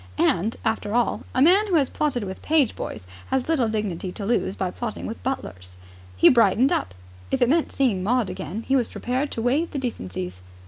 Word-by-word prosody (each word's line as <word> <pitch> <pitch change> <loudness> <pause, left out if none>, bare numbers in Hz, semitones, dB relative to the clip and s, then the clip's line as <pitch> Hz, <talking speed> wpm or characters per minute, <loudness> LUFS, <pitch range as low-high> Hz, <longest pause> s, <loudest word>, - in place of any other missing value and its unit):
And, 200 +7 +2
after 220 -1 -1
all, 240 -1 +1
a 255 - +5
man 385 +7 +5
who 370 - +1
has 285 -4 +4
plotted 280 -7 -1
with 190 -1 -6
page 300 -6 +2
boys - - -6 0.2
has 265 -1 -1
little 275 -8 +2
dignity 200 -4 -3
to 205 - -6
lose 210 -3 0
by 185 -2 -2
plotting 235 +1 -5
with 225 - -6
butlers. 90 - -5 0.4
He - - +7
brightened 230 +2 +5
up. 90 - -1 0.3
If - - 0
it 245 - +4
meant 320 +3 +2
seeing 240 -9 +1
Maud 235 +3 +1
again 185 +3 -5
he 270 - +3
was 250 -4 +2
prepared 260 +4 -2
to 225 - -3
waive 285 +8 +1
the - - -5
decencies. 90 - -5
230 Hz, 200 wpm, -24 LUFS, 190-265 Hz, 0.4 s, He